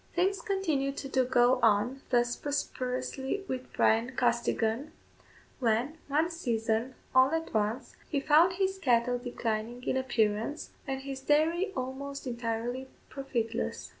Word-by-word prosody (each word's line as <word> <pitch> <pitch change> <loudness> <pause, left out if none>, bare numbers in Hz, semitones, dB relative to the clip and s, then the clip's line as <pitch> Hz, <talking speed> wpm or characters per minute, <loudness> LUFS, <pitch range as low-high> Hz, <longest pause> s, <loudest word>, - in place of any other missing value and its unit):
Things 380 +3 +2
continued 320 - -1
to 270 -2 +1
go 250 0 +4
on 230 +4 +3
thus 240 -1 +2
prosperously 265 +4 -3
with 255 0 -4
Bryan 230 +3 +2
Costigan, 235 +3 0 0.7
when, 250 +6 +1
one 310 +4 +1
season, 235 -5 -1 0.2
all 260 0 +6
at 325 0 -2
once, 220 +4 -1
he 290 - +1
found 315 +6 +5
his 385 +1 0
cattle 245 -3 +2
declining 240 -1 -3
in 260 - 0
appearance, 230 +2 0 0.2
and 265 -1 -2
his 270 -1 -6
dairy 320 +7 +2
almost 275 +2 -4
entirely 240 +1 -3 0.2
profitless. 235 -4 -3
260 Hz, 125 wpm, -30 LUFS, 235-290 Hz, 0.7 s, all